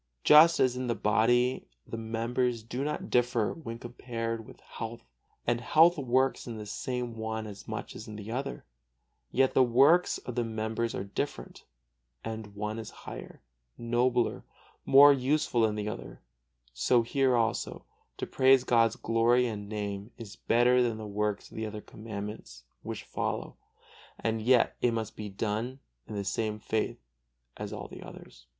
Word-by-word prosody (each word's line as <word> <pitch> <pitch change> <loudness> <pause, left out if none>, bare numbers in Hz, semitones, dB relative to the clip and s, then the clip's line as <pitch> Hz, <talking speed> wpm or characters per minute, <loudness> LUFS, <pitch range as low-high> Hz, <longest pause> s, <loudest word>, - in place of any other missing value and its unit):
Just 160 +3 +8
as 125 -1 +3
in 125 0 -3
the 115 - 0
body 120 +4 +2 0.2
the - - -6
members 115 +1 -1
do 120 +4 -4
not 150 +1 -3
differ 120 -3 +2
when 115 -8 -7
compared 115 -1 -5
with - - -14
health, 115 0 -7 0.4
and 120 0 +1
health 165 +7 +5
works 130 0 +1
in 115 -2 -5
the 125 +4 -3
one 110 0 -3
as 100 -2 -10
much - - -5
as - - -8
in 105 - -8
the 105 +1 -7
other; 135 - -4 0.7
yet 130 +1 +3
the - - +5
works 135 +8 +5
of 125 - -7
the 120 0 0
members 110 +1 -2
are - - -3
different, 100 - -5 0.6
and 110 -2 -6
one 105 +2 -3
is 110 - -6 0.2
higher, - - -9 0.3
nobler, 120 0 +1 0.4
more 145 +1 +9
useful 135 -2 +1
than 110 -1 +2
the 105 0 -3
other; - - -6 0.5
so, 120 - +3
here 130 +2 +2
also, 115 -2 -1 0.3
to - - -3
praise 130 -1 +4
God's 115 -3 +3
glory 115 +2 +3
and 105 -3 -5
Name 100 -1 -4
is 105 -3 -9
better 125 +2 +3
than 115 -3 0
the 110 - -7
works 105 0 -2
of - - -11
the 110 0 -2
other 105 0 -6
Commandments 105 - -8 0.2
which - - -6
follow; - - -3 0.6
and 110 -1 -1
yet 125 +1 +4
it 120 - +2
must 110 -2 -4
be 105 -1 -6
done 110 +6 -3 0.3
in 105 - -7
the 100 -1 -3
same 110 +1 -1
faith 110 0 -2 0.6
as - - -6
all - - -6
the - - -11
others. - - -13
115 Hz, 165 wpm, -29 LUFS, 110-125 Hz, 0.7 s, more